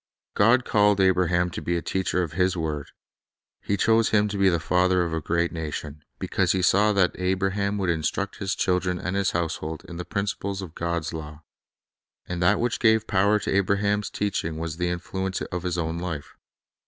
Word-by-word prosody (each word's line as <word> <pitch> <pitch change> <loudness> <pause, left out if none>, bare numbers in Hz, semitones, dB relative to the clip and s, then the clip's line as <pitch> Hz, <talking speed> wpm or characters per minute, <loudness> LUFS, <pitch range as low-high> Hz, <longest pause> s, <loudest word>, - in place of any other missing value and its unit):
God 115 +5 +4
called 105 -1 +3
Abraham 90 -2 +2
to - - -5
be 85 0 -1
a - - -2
teacher 95 -1 0
of 80 - -4
His 90 +2 +1
word, 75 -3 -3 0.7
He 100 - -1
chose 115 +3 +3
him 105 -1 +3
to 100 - -3
be 95 -1 +5
the 85 -2 +1
father 90 +1 +2
of 85 -1 -3
a 80 - -1
great 85 +2 0
nation, 75 -2 -5 0.2
because - - 0
He 95 -1 0
saw 105 +3 +4
that 95 -3 +3
Abraham 95 +2 0
would 95 -3 +1
instruct 85 +5 -2
his 100 -1 -2
children 90 0 0
and 90 +1 -3
his 100 -1 +1
household 80 -2 -3
in 85 - -8
the 90 - -4
principles 100 -1 -3
of 85 -4 -9
God's 85 -1 -2
law. 75 -1 -8 0.8
And 90 0 -4
that 90 - +4
which 120 0 0
gave 110 -1 +4
power 100 +1 +3
to - - -1
Abraham's 100 +1 +1
teaching 85 -6 -2
was 80 0 -4
the 90 0 0
influ 95 +2 -3
ence 95 - -3
of 90 -1 -4
his 90 0 -2
own 85 0 -2
life. 85 -5 -5
90 Hz, 195 wpm, -25 LUFS, 85-100 Hz, 0.8 s, be